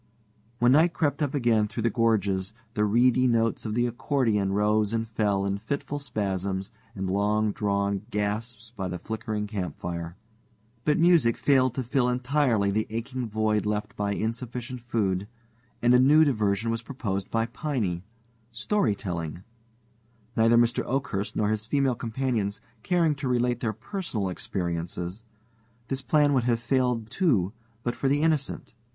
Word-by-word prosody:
When 120 +1 +4
night 160 +5 +5
crept 145 -3 0
up 145 -1 0
again 115 -5 +3
through 115 +1 -4
the 115 - +2
gorges, 100 -4 +1 0.2
the 105 - +1
reedy 125 +4 +4
notes 115 -1 +1
of 105 - -3
the 120 0 +2
accordion 120 -5 0
rose 105 +1 +2
and 115 0 -1
fell 105 -3 0
in 100 0 -1
fitful 140 +5 -3
spasms 95 -6 -2 0.2
and 95 -1 -3
long 105 +2 +1
drawn 100 -2 0
gasps 110 +2 -3
by 95 -3 -3
the 90 0 -4
flickering 110 +2 -4
campfire. 85 -4 -4 0.7
But 150 - +3
music 165 -9 +4
failed 130 -3 +3
to 130 - -1
fill 125 +1 +1
entirely 125 -5 +1
the 110 +2 0
aching 120 +2 -4
void 110 -1 +1
left 105 0 -2
by 100 0 -1
insufficient 120 +3 -4
food, 100 -5 -1 0.6
and 120 +1 +5
a 125 - +7
new 150 +5 +6
diversion 110 -4 +1
was 115 0 -2
proposed 115 -6 -4
by 115 0 +1
Piney 115 - -2 0.5
storytelling. 100 - -1 0.9
Neither 115 +1 +5
Mr. 120 0 +3
Oakhurst 120 -7 -2
nor 105 -1 +1
his 110 0 -2
female 140 0 +2
companions 115 -4 -2 0.2
caring 170 -1 +2
to 140 -1 -4
relate 125 -1 +1
their 115 -3 -1
personal 115 - -4
experiences, 90 +1 -4 0.7
this 135 0 -1
plan 145 0 +3
would 125 -3 +2
have 120 -2 +2
failed 120 -2 0
too 110 - +2 0.3
but 120 - -1
for 135 - -1
the 145 +3 +2
Innocent. 155 -7 0
115 Hz, 150 wpm, -27 LUFS, 100-130 Hz, 0.9 s, a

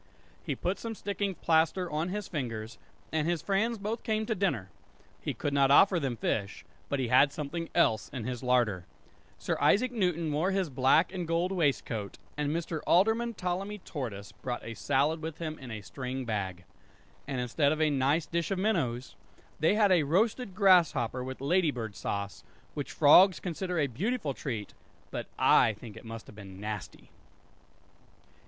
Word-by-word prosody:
He - - -2
put 185 +2 -2
some 225 -1 -5
sticking 200 -1 -3
plaster 165 +3 +2
on 160 +2 -2
his 205 +1 -4
fingers, 115 -7 -5 0.3
and 155 0 0
his 170 -3 -1
friends 220 +4 +1
both 215 +3 -3
came 220 0 -1
to 220 - 0
dinner. 175 - -1 0.5
He - - -3
could 145 - -2
not 140 -1 +4
offer 180 +5 +6
them 135 -5 -2
fish, 100 -2 -2 0.2
but 140 - 0
he 130 -3 -1
had 140 +3 +5
something 155 +3 -4
else 110 -11 +2
in 125 -4 -5
his 125 +1 -4
larder. 120 -8 +1 0.5
Sir - - -2
Isaac 250 +5 +4
Newton 180 -8 0
wore 160 +6 +1
his 190 -5 0
black 135 +7 +3
and 180 -3 -3
gold 170 +3 0
waistcoat, 135 - -1 0.2
And 150 -1 -1
Mr. 165 +1 -2
Alderman 225 +6 +3
Ptolemy 190 +3 -3
Tortoise 120 - -6
brought 125 -1 -5
a 115 - -5
salad 145 +6 +1
with 160 -1 -5
him 155 -2 -5
in 130 - -9
a 110 -2 -6
string 125 +6 -5
bag. 95 -5 -3 0.6
And 135 -3 -2
instead 140 +4 +1
of 155 - -1
a 155 -1 +3
nice 140 +4 +2
dish 170 -1 -2
of 195 - -1
minnows 160 - -1 0.4
they 160 +6 +3
had 210 -2 +4
a 180 -3 +5
roasted 200 - 0
grasshopper 170 - +4
with 130 0 -7
lady 170 +4 +2
bird 115 -7 -4
sauce; 100 0 -4 0.3
which 145 - -5
frogs 180 +5 +6
consider 180 0 -3
a 150 - +3
beautiful 150 - -2
treat; 115 -7 -5 0.4
but - - -4
I 110 - +5
think 105 0 -11
it 115 - -12
must 115 0 -8
have - - -14
been 95 -2 -11
nasty! 105 -2 -7
150 Hz, 175 wpm, -30 LUFS, 125-185 Hz, 0.6 s, offer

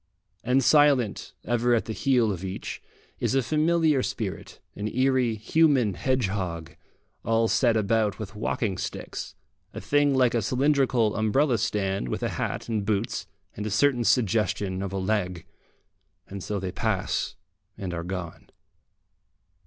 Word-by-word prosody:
And 130 +3 +2
silent, 140 -7 +3
ever 120 +1 +2
at 115 - 0
the 110 - -4
heel 125 -3 +2
of 95 -2 -5
each, 95 0 -5 0.4
is - - 0
a 135 - +3
familiar 155 -1 +2
spirit, 105 -6 -5 0.2
an 105 - -3
eerie 130 -1 +1
human 125 -1 +2
hedgehog, 95 -10 -2 0.5
all 115 0 +2
set 115 -1 +3
about 105 -1 +1
with 105 -2 -7
walking 105 -2 -2
sticks, - - -6 0.4
a - - -4
thing 145 +7 +2
like 125 -2 +3
a 120 - +1
cylindrical 130 -2 +2
umbrella 115 +3 +2
stand 95 -10 -1
with - - -3
a - - 0
hat - - -3
and 110 -3 -1
boots 105 +1 -2 0.3
and 105 +1 -4
a - - -2
certain 120 +4 +2
suggestion 105 -5 +1
of 100 -1 -4
leg. 95 -3 -2 0.8
And 100 -1 -7
so 105 -1 -2
they 95 -1 -4
pass - - -1 0.4
and 95 -3 -5
are 85 -1 -3
gone. 90 -1 -6
110 Hz, 145 wpm, -26 LUFS, 100-130 Hz, 0.8 s, silent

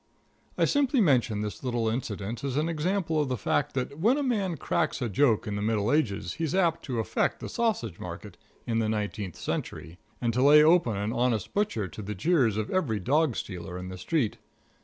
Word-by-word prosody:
I - - +4
simply 280 -2 +2
mention 125 - +3
this 105 +4 -5
little 120 -3 -1
incident 110 0 -3
as 140 -1 -2
an 155 +2 +1
example 165 0 0
of 145 - -1
the 125 - -1
fact 130 +6 0
that 140 +3 -3
when 230 - +3
a 290 - 0
man 200 - 0
cracks 155 +3 -1
a 125 - -1
joke 115 +1 +2
in 105 -2 -3
the 100 - -3
Middle 105 +1 +1
Ages 100 - 0
he's 165 +1 -2
apt 170 -4 +2
to 125 -5 -3
affect 110 -5 0
the - - -6
sausage 205 - -1
market - - -8 0.3
in 115 -1 0
the 110 -1 0
Nineteenth 105 -4 -3
Century, 85 +3 -5 0.2
and 120 -1 0
to 125 - +1
lay 150 +2 +8
open 160 - +4
an 105 +3 -2
honest 120 -4 0
butcher 200 - 0
to 95 - -8
the 105 +1 -5
jeers 120 - +2
of 110 -1 -2
every 135 - 0
dog 140 - +2
stealer 90 -1 -6
in 90 0 -6
the 95 - -7
street. 120 - 0
125 Hz, 205 wpm, -28 LUFS, 105-160 Hz, 0.3 s, lay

